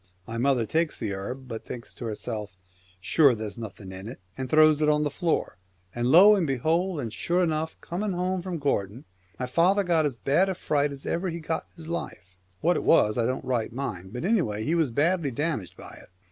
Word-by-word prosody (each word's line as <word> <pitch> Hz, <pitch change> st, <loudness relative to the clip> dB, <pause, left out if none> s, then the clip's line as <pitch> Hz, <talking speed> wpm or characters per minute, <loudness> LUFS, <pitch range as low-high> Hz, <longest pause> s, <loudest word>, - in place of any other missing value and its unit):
My 115 Hz, +3 st, -5 dB
mother 130 Hz, -2 st, +2 dB
takes 165 Hz, +5 st, 0 dB
the 110 Hz, -5 st, -3 dB
herb, 125 Hz, +7 st, -6 dB
but 115 Hz, -2 st, -6 dB
thinks 120 Hz, -2 st, -7 dB
to 120 Hz, -, -8 dB
herself, 105 Hz, -3 st, -5 dB, 0.2 s
" 90 Hz, 0 st, -31 dB
Sure 140 Hz, -6 st, +5 dB
there's 110 Hz, +1 st, -5 dB
nothing 100 Hz, -4 st, -8 dB
in 95 Hz, +2 st, -8 dB
it," 120 Hz, -, -8 dB, 0.2 s
and 130 Hz, -1 st, -5 dB
throws 155 Hz, 0 st, +5 dB
it 150 Hz, -, +3 dB
on 150 Hz, 0 st, +3 dB
the 145 Hz, -, -1 dB
floor, 170 Hz, -, -1 dB, 0.3 s
and 120 Hz, 0 st, -1 dB
lo 185 Hz, +10 st, +8 dB
and 190 Hz, -6 st, +1 dB
behold, 160 Hz, +6 st, 0 dB
and 115 Hz, -5 st, -4 dB
sure 175 Hz, -, +1 dB
enough! 160 Hz, -1 st, -2 dB
coming 195 Hz, +3 st, -3 dB
home 180 Hz, +1 st, -1 dB
from 180 Hz, -1 st, -4 dB
Gortin, 120 Hz, -4 st, -1 dB, 0.4 s
my 125 Hz, -, -1 dB
father 175 Hz, +10 st, +3 dB
got 165 Hz, -4 st, +2 dB
as 130 Hz, -5 st, -5 dB
bad 150 Hz, +10 st, +2 dB
a 190 Hz, -, -2 dB
fright 145 Hz, -4 st, 0 dB
as 140 Hz, -1 st, -7 dB
ever 180 Hz, +2 st, -1 dB
he 170 Hz, 0 st, -4 dB
got 160 Hz, 0 st, -3 dB
in -, -, -31 dB
his 160 Hz, -1 st, -10 dB
life. 95 Hz, -, -6 dB, 0.2 s
What 175 Hz, +2 st, +3 dB
it -, -, -2 dB
was 105 Hz, -9 st, +4 dB
I 115 Hz, -1 st, +1 dB
don't 130 Hz, +1 st, -3 dB
right 120 Hz, -4 st, -1 dB
mind, 95 Hz, -8 st, -5 dB
but 125 Hz, +7 st, -4 dB
anyway 120 Hz, -, +1 dB
he 155 Hz, -, 0 dB
was 165 Hz, -5 st, +2 dB
badly 155 Hz, +5 st, +1 dB
damaged 135 Hz, -, -3 dB
by -, -, -10 dB
it. -, -, -17 dB
140 Hz, 225 wpm, -26 LUFS, 115-170 Hz, 0.4 s, lo